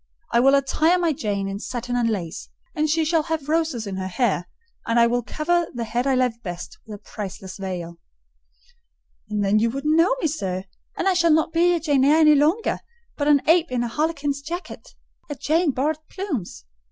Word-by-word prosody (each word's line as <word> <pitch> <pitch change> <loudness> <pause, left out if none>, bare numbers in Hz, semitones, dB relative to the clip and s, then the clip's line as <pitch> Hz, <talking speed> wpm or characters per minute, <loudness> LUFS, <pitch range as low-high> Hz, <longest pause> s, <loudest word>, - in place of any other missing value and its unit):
"I 235 - +5
will 270 +3 +5
attire 310 +5 +2
my 340 -3 +1
Jane 205 -6 -2
in 195 0 -4
satin 245 +1 -4
and 240 -2 +1
lace, 180 -7 -4 0.2
and 310 -1 0
she 320 +1 +2
shall 325 0 +2
have 315 -3 -3
roses 315 -7 0
in 195 -2 -5
her 185 0 -3
hair; 190 -3 -1 0.4
and 230 +1 +2
I 235 - +6
will 245 +1 +1
cover 335 +7 0
the 235 - -2
head 235 +4 -1
I 270 - +3
love 250 -2 0
best 175 -4 -7
with 215 - -7
a - - -9
priceless 195 -2 -8
veil." 180 -3 -5 1.3
"And 210 -1 -1
then 205 +2 +3
you 230 +2 +2
won't 275 +4 -5
know 330 +9 +4
me, - - -2
sir; 190 -12 -2 0.3
and - - 0
I 380 - +4
shall 340 -2 +3
not 320 +1 +2
be 340 +1 +4
your 350 -1 +2
Jane 290 -4 +2
Eyre 295 +3 +5
any 305 -1 +7
longer, 310 +10 +2 0.4
but 290 - -1
an 290 -2 +4
ape 330 -2 +4
in 245 -1 0
a - - -1
harlequin's 290 +1 -1
jacket—a 325 -2 -9
jay 305 +5 +1
in 350 - +1
borrowed 290 +4 0
plumes. 280 - -5
275 Hz, 205 wpm, -23 LUFS, 220-315 Hz, 1.3 s, any